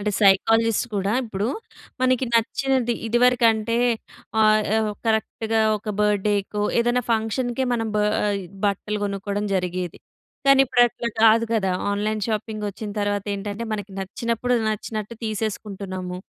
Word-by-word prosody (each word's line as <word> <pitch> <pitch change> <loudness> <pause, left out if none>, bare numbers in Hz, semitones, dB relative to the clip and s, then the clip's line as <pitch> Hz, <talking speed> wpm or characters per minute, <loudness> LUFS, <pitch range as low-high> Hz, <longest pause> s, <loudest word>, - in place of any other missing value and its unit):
అంటే 210 +1 -1
సైకాలజిస్ట్ 225 +4 +4
కూడా 195 +1 0
ఇప్పుడు, 205 -2 -3 0.5
మనకి 255 0 +2
నచ్చినది 250 +1 +1
ఇదివరకంటే 230 -1 +3 0.6
ఆహ్, 215 0 +5 0.2
ఆ - - +2 0.3
కరెక్ట్‌గా 220 0 0 0.2
ఒక 215 - -10
బర్త్‌డేకో 205 0 +1 0.2
ఏదైనా 240 +1 +1
ఫంక్షన్‌కే 240 +3 -1
మనం 225 -1 -1
బా 210 - +2 0.2
ఆహ్ 205 -1 0 0.3
బట్టలు 210 +1 -1
కొనుక్కోవడం 200 +1 -2
జరిగేది. 180 -1 -2 0.5
కానీ 275 0 +7
ఇప్పుడు 245 -1 +3
అట్లా 235 0 -4
కాదు 225 +1 +6
కదా! 195 -4 +1 0.2
ఆన్‌లైన్ 215 +1 -1
షాపింగ్ 215 -1 -3
వచ్చిన 210 +1 -7
తర్వాత 205 -1 -1
ఏంటంటే, 205 +2 -5
మనకి 205 -1 -4
నచ్చినప్పుడు 230 +5 -1
నచ్చినట్ట్టు 215 +1 -4
తీసేసుకుంటున్నాము. 195 -4 -4
215 Hz, 125 wpm, -23 LUFS, 205-230 Hz, 0.6 s, కానీ